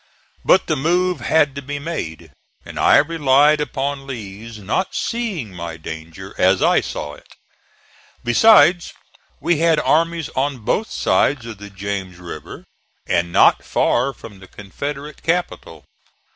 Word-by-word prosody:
But 185 - +4
the 155 - 0
move 175 +4 +1
had 145 +2 +2
to 140 - -6
be 145 +2 -5
made, 85 - -6 0.3
and - - -8
I - - +6
relied 150 -1 +3
upon 140 -1 -3
Lee's 110 -2 -8
not 105 - -2
seeing 200 - -3
my 85 -2 -6
danger 80 +5 -9
as 95 +1 +3
I - - +4
saw 75 - -6
it. - - -16 1.0
Besides 175 - +5 0.5
we 170 -3 +1
had 165 -2 +3
armies 165 0 +1
on 140 +1 -1
both 220 - 0
sides 135 -5 +1
of 110 -3 -8
the 105 0 -9
James 95 -2 -5
River 85 -4 -9 0.4
and 85 0 0
not - - +4
far 135 - +1
from 105 -7 -13
the 95 - -14
Confederate 140 +10 -7
capital. 175 +2 -3
135 Hz, 140 wpm, -20 LUFS, 95-160 Hz, 1.0 s, I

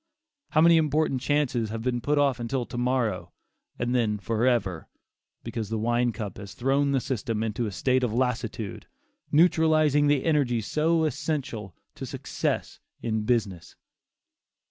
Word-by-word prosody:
How 155 - +3
many 170 0 +7
important 155 -4 +1
chances 130 -7 0
have 110 +1 -5
been 120 -1 -1
put 145 +5 0
off 140 -3 +2
until 120 +1 -2
to - - -10
morrow, 120 -6 -1 0.4
and 120 +1 -1
then 110 -4 +1
forever, 110 -5 0 0.6
because 110 -4 -4
the 110 - -1
wine 120 +2 +1
cup 110 0 -6
has 100 -1 -9
thrown 135 +3 +1
the 135 - +2
system 115 -3 -2
into 110 +1 -2
a - - -4
state 130 +6 +1
of 120 - +1
lassitude, 115 -4 -2 0.4
neutralizing 155 -2 +4
the 145 -2 +2
energies 130 -9 +1
so 160 +4 +1
essential 145 - -3 0.2
to - - -7
success - - -3 0.2
in 110 -2 -1
business. 105 -8 -1
125 Hz, 145 wpm, -26 LUFS, 110-145 Hz, 0.6 s, many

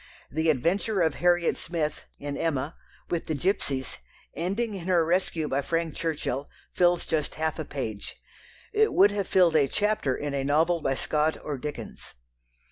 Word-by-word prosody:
The 160 +3 +1
adventure 180 - +1
of 160 -1 +3
Harriet 175 -1 +3
Smith 155 -3 -3
(in 145 0 -5
Emma) 150 -1 -1 0.4
with 170 -2 -1
the 155 - -1
gipsies, 140 -5 -1 0.4
ending 200 +8 -1
in 185 -3 -6
her 175 -3 +4
rescue 170 -2 +1
by 140 0 0
Frank 165 +1 -1
Churchill, 145 -4 -2 0.2
fills 175 -1 +3
just 155 -3 -1
half 160 0 -1
a 155 - -3
page. 110 -8 -5 0.6
It 435 0 +3
would 200 +2 +6
have 205 -2 -2
filled 175 -4 +4
a 145 -3 +5
chapter 205 -7 +1
in 145 -1 -3
a 140 -1 0
novel 160 +4 +2
by 135 -2 +1
Scott 155 +3 +1
or 150 - -3
Dickens. 150 +2 -7
160 Hz, 165 wpm, -27 LUFS, 145-175 Hz, 0.6 s, would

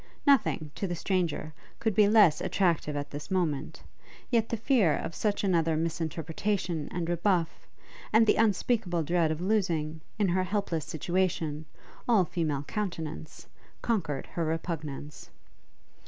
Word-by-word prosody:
Nothing, 235 - +3
to 195 - -3
the 175 - -2
stranger, 170 -4 -1 0.3
could 220 -2 0
be 210 +1 +5
less 205 -7 +5
attractive 175 -5 +1
at 145 0 -4
this 145 +1 -7
moment; 160 -6 -1 0.5
yet 230 -2 +2
the 230 - -1
fear 215 - +3
of - - -5
such 205 +2 -1
another 165 -4 +2
misinterpretation 165 +1 -2
and 175 -2 -3
rebuff, 175 0 0 0.4
and 220 +1 +6
the - - +5
unspeakable 210 -5 +1
dread 170 0 +2
of 155 +1 -2
losing, 165 -6 0 0.2
in 205 -3 +2
her 185 +1 +2
helpless 185 -5 -2
situation, 165 -2 -1 0.4
all 210 -6 +5
female 155 -4 -2
countenance, 160 -5 -5 0.4
conquered 165 - -1
her 170 - -3
repugnance. 155 -3 -4
170 Hz, 135 wpm, -29 LUFS, 155-200 Hz, 0.5 s, and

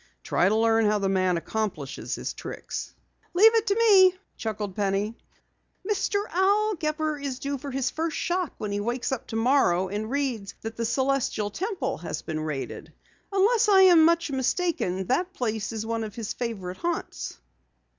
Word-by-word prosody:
Try 180 - +2
to 215 - +2
learn 225 0 +3
how 210 0 +3
the 200 -1 0
man 185 -2 +2
accomplishes 175 -7 -3
his - - -4
tricks." - - -6 0.4
"Leave 440 +5 +7
it 455 0 +2
to 400 - +2
me," 390 -5 +6 0.2
chuckled 210 -4 -4
Penny. 205 +2 0 0.7
"Mr. 410 0 0
Al 405 +4 +3
Gepper 310 -3 -2
is 275 -2 -4
due 280 0 -3
for 280 - -6
his 265 -1 -1
first 325 -1 -2
shock 355 -2 -1
when 210 - -4
he 205 - -1
wakes 240 +5 -2
up 265 - -3
tomorrow 225 -6 +2
and 210 +3 -3
reads 255 -7 -2
that 225 0 -6
the 230 - -2
Celestial 260 -4 0
Temple 350 - -3
has 165 -2 -5
been 155 -1 -3
raided. 150 -3 -5 0.4
Unless 425 +3 +3
I 390 -2 +7
am 350 -4 +7
much 335 -1 +3
mistaken, 260 - 0
that 355 - 0
place 220 - -2
is 220 -1 -4
one 230 0 -2
of 215 -2 -7
his 230 -2 -4
favorite 195 -7 -4
haunts." 345 - -4
250 Hz, 170 wpm, -26 LUFS, 210-345 Hz, 0.7 s, Leave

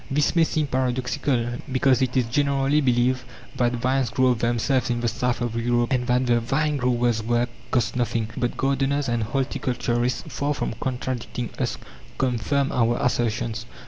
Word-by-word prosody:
This 145 +4 +1
may 165 - +5
seem 155 -1 0
paradoxical, 125 -1 -1
because 130 0 +3
it 130 0 0
is 125 - +3
generally 140 +3 +2
believed 125 -1 +2 0.3
that 120 -1 +1
vines 130 +1 0
grow 130 +1 +2
of 120 -3 +1
themselves 120 +3 +1
in 120 0 0
the 120 - 0
south 120 +1 -1
of 120 -1 -2
Europe, 120 +1 +1
and 125 -1 0
that 125 +1 +2
the 120 -1 +3
vine 145 +6 0
grower's 120 -3 +1
work 120 +2 0 0.2
costs 120 -2 0
nothing. 115 -2 0
But 120 - -2
gardeners 135 +1 +1
and 120 -1 0
horticulturists, 125 0 -1
far 145 +1 -2
from - - -2
contradicting 125 -2 -3
us, - - -1 0.4
confirm 135 +2 0
our 120 0 +2
assertions. 115 -2 -1
125 Hz, 165 wpm, -24 LUFS, 120-135 Hz, 0.4 s, may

